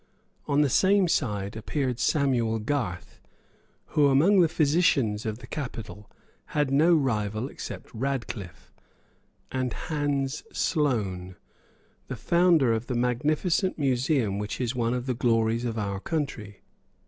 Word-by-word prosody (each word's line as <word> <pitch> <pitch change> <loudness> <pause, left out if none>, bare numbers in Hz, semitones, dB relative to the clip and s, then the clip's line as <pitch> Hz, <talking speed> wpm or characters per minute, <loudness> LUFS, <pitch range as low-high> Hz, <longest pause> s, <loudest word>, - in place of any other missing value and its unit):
On 145 +1 +3
the 145 - +4
same 190 +7 +3
side 105 - -1
appeared 125 +2 -2
Samuel 125 -6 +1
Garth, 110 -6 -3 0.7
who, 145 -2 +5
among 160 +9 +4
the 170 - +6
physicians 140 -10 +2
of 110 0 -3
the - - -11
capital, 115 -7 -7 0.5
had 145 -2 +2
no 160 +5 +5
rival 110 -5 -1
except - - -8
Radcliffe, 115 -7 -5 0.8
and 130 -2 -2
Hans 145 -3 -2
Sloane, 100 - -1 0.7
the 130 - -4
founder 165 0 +3
of 115 +1 -3
the 125 - -2
magnificent 150 +10 0
museum 130 -6 +1
which 105 +1 -4
is 125 -1 -1
one 120 -1 0
of 125 0 -3
the 130 - 0
glories 115 0 +1
of 115 -1 -3
our 100 -2 -2
country. 115 - -4
125 Hz, 130 wpm, -26 LUFS, 110-145 Hz, 0.8 s, the